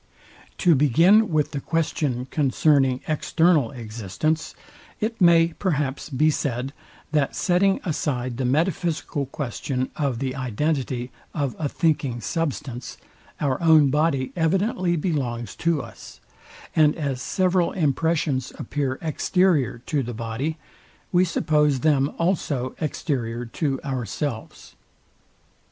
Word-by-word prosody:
To 175 - +4
begin 165 - +5
with 155 -3 +1
the 140 - -3
question 145 -6 -1
concerning 135 -2 +2
EXTERNAL 155 -3 +2
existence, 115 - -3 0.4
it 225 0 -3
may 170 -1 +6
perhaps 150 -8 -1
be 155 +3 +3
said, 135 -1 -2 0.4
that 150 -3 +1
setting 190 +1 +2
aside 130 -7 -2
the 130 - -1
metaphysical 160 0 0
question 130 -1 -3
of 140 -5 -1
the 130 +1 -3
identity 130 0 -2 0.2
of 140 -6 -1
a 150 -3 -1
thinking 145 -7 0
substance, 135 -4 -3 0.4
our 140 -1 0
own 155 -4 +6
body 145 -3 +1
evidently 180 +1 +1
belongs 135 -9 -2
to 165 -5 0
us; - - -12 0.6
and 150 -2 +5
as 140 -5 -3
several 185 +2 +1
impressions 155 -3 0
appear 135 -3 -2
exterior 160 -5 +1
to 150 -3 0
the 120 -2 -5
body, 115 +8 -3 0.5
we 180 0 +4
suppose 150 -6 +1
them 145 -3 +2
also 150 -7 -1
exterior 125 -6 -2
to 135 +3 -2
ourselves. 130 -1 -4
145 Hz, 115 wpm, -24 LUFS, 130-165 Hz, 0.6 s, may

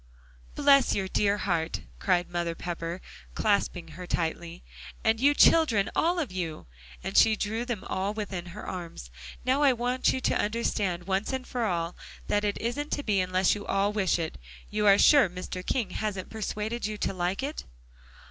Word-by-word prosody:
"Bless 280 -3 +5
your 195 -1 -1
dear 200 +1 +1
heart!" 170 -4 -1 0.2
cried 180 -2 +1
Mother 175 -1 -2
Pepper, 170 +1 -5 0.3
clasping 200 -5 0
her 175 +3 -9
tightly, 170 +1 -3 0.4
"and 220 0 +2
you 285 +3 +4
children, 260 -14 +4
all 345 +2 +2
of 310 - -2
you," 170 -4 -4 0.4
and 190 +2 -5
she 220 - +6
drew 220 +3 -2
them 235 -5 -4
all 195 -3 -2
within 200 -5 -5
her 185 +5 -8
arms. 170 - -7 0.3
"Now 260 +3 +2
I 280 -3 +5
want 245 +2 +1
you - - -2
to - - +1
understand, 205 -5 -1
once 195 +4 -1
for 245 -2 -2
all, 170 -3 -1 0.3
that 205 0 0
it 205 -1 0
isn't 285 +6 -2
to 290 - -2
be 205 -5 +1
unless 185 0 +2
you 205 - -5
all 200 +1 +1
wish 195 -4 +1
it. 160 - -4 0.3
You 210 0 +1
are 200 0 +7
sure 280 -6 +6
Mr. 180 +1 -6
King 220 -2 -1
hasn't 200 -3 -4
persuaded 220 +1 -3
you 215 0 -5
to 195 - -1
like 180 +5 -2
it?" 290 +3 -4
200 Hz, 175 wpm, -28 LUFS, 180-230 Hz, 0.4 s, are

